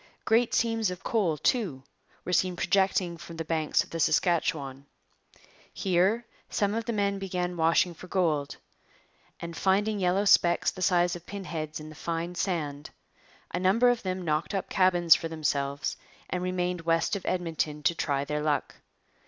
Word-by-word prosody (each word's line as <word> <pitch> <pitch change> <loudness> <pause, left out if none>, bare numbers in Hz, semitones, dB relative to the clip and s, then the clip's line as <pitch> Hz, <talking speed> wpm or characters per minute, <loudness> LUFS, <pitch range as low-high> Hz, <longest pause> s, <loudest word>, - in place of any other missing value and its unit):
Great 230 +2 +3
seams 225 -3 +1
of 180 -1 -7
coal, 190 -9 +1
too, 175 - 0 0.4
were 180 - -2
seen 185 0 +2
projecting 190 -2 +1
from 170 0 -10
the 165 - -4
banks 160 -1 +1
of - - -18
the 165 - -4
Saskatchewan. 150 -5 0 0.8
Here 195 +5 +1 0.2
some 205 0 0
of 225 0 -2
the 235 - -1
men 200 -2 0
began 180 -2 -3
washing 165 +1 +2
for 185 - -12
gold, 160 -6 0 0.8
and, 170 0 -7
finding 205 +3 +1
yellow 185 +2 +1
specks 175 -3 +4
the 185 - -10
size 175 -2 +3
of 175 0 -11
pin 200 -1 -6
heads 155 -3 -5
in 155 0 -9
the - - -10
fine 170 +2 -3
sand, 150 -6 -3 0.6
a 175 - -2
number 205 +7 +4
of 245 -1 +1
them 185 -1 -3
knocked 155 +5 -1
up 195 - -3
cabins 175 -3 +5
for 165 - 0
themselves 140 -3 -2 0.3
and 180 - -1
remained 180 -1 -1
west 165 +4 +1
of 200 - -5
Edmonton 160 -4 -2
to 170 - +3
try 140 -4 -1
their 150 +1 -2
luck. 150 -1 -1
175 Hz, 170 wpm, -28 LUFS, 160-190 Hz, 0.8 s, cabins